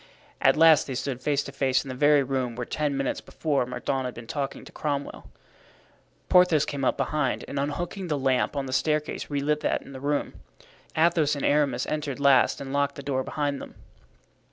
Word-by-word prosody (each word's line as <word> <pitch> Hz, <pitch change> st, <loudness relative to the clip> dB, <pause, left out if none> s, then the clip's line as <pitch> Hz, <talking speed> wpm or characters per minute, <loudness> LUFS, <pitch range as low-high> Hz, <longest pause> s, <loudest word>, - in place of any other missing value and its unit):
At -, -, +4 dB
last 160 Hz, -2 st, +6 dB
they 135 Hz, -, -4 dB
stood 130 Hz, 0 st, -3 dB
face 145 Hz, +1 st, +1 dB
to -, -, -8 dB
face 130 Hz, -2 st, +1 dB
in -, -, -8 dB
the -, -, -3 dB
very 145 Hz, +2 st, +4 dB
room 130 Hz, -3 st, -2 dB
where 125 Hz, 0 st, -4 dB
ten 145 Hz, 0 st, -1 dB
minutes 135 Hz, -1 st, -2 dB
before 140 Hz, -6 st, -1 dB
Mordaunt 130 Hz, +1 st, -2 dB
had 125 Hz, -, -5 dB
been 115 Hz, -, -9 dB
talking 140 Hz, +3 st, -4 dB
to -, -, -12 dB
Cromwell. 145 Hz, -, -4 dB, 1.0 s
Porthos 180 Hz, -5 st, +5 dB
came 140 Hz, -1 st, -4 dB
up -, -, +1 dB
behind, 150 Hz, -4 st, -1 dB
and 140 Hz, -, -3 dB
unhooking 175 Hz, +6 st, -3 dB
the 150 Hz, -3 st, -1 dB
lamp 135 Hz, 0 st, +1 dB
on 140 Hz, -1 st, -2 dB
the 130 Hz, -, -5 dB
staircase 150 Hz, +2 st, -1 dB
relit 145 Hz, +1 st, 0 dB
that 150 Hz, -, -1 dB
in -, -, -13 dB
the 135 Hz, -, -8 dB
room. 145 Hz, +1 st, -1 dB, 0.6 s
Athos 160 Hz, -2 st, +3 dB
and 140 Hz, -, -3 dB
Aramis 140 Hz, -4 st, +2 dB
entered 145 Hz, -3 st, -3 dB
last 140 Hz, -2 st, +4 dB
and 135 Hz, -1 st, -6 dB
locked 140 Hz, 0 st, +1 dB
the 140 Hz, -, -8 dB
door 135 Hz, -2 st, -1 dB
behind 145 Hz, 0 st, -2 dB
them. -, -, -10 dB
140 Hz, 200 wpm, -26 LUFS, 135-150 Hz, 1.0 s, last